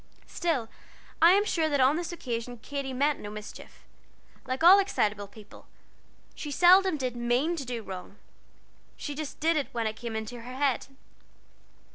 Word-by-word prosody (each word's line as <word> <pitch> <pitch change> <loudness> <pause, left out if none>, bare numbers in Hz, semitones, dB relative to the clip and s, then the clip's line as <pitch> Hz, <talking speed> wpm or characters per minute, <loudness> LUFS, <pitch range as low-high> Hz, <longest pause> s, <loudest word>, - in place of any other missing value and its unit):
Still, 305 -10 -1 0.5
I 335 +2 +8
am 405 +2 +3
sure 325 -6 0
that 285 -2 +1
on 265 +3 +4
this 345 +1 -3
occasion 245 -6 -5
Katy 275 +3 -5
meant 285 +3 +1
no 205 - -7
mischief. 210 0 -10 0.6
Like 260 +4 -2
all 370 +4 +9
excitable 210 - 0
people 210 +1 -15 0.7
she 300 - -7
seldom 360 +3 +5
did 255 -3 -3
mean 240 +8 0
to 275 - -4
do 240 -2 -4
wrong, 190 +1 -9 0.8
she 290 - -5
just 300 0 -6
did 325 +1 +2
it 285 - -1
when 230 -1 -1
it 215 0 -2
came 230 -1 -6
into 220 +2 -5
her 250 +2 -9
head. 270 -2 0
265 Hz, 165 wpm, -28 LUFS, 230-320 Hz, 0.8 s, all